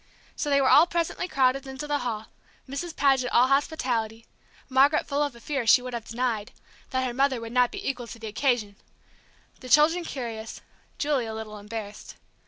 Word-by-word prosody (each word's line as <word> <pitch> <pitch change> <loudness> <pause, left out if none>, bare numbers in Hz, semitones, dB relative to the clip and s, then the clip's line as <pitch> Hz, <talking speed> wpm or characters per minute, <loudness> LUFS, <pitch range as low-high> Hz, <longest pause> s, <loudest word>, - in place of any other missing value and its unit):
So 295 - -2
they 280 -1 +4
were 270 - +3
all 315 +4 +7
presently 340 +1 -2
crowded 270 -3 +1
into 265 +2 -6
the 295 -1 -1
hall, 225 -3 -3 0.4
Mrs. 315 +5 -5
Paget 265 -3 +2
all 250 +2 +4
hospitality, 245 -6 0 0.4
Margaret 275 +3 +4
full 285 0 -1
of 290 -4 -1
a - - -13
fear 270 -2 -3
she 250 - +7
would 250 0 -7
have 235 -2 -5
denied 230 -3 -2 0.4
that 260 0 -1
her 245 - -3
mother 270 0 +1
would 230 0 -8
not 250 -1 +3
be - - -6
equal 250 -3 -3
to 230 - -9
the 225 - -9
occasion, 220 -2 -1 0.8
the 255 - -10
children 320 +6 +5
curious, 230 -7 -6 0.4
Julie 285 -5 0
a 220 - -5
little 215 -1 -7
embarrassed. 210 0 -8
255 Hz, 190 wpm, -26 LUFS, 230-280 Hz, 0.8 s, all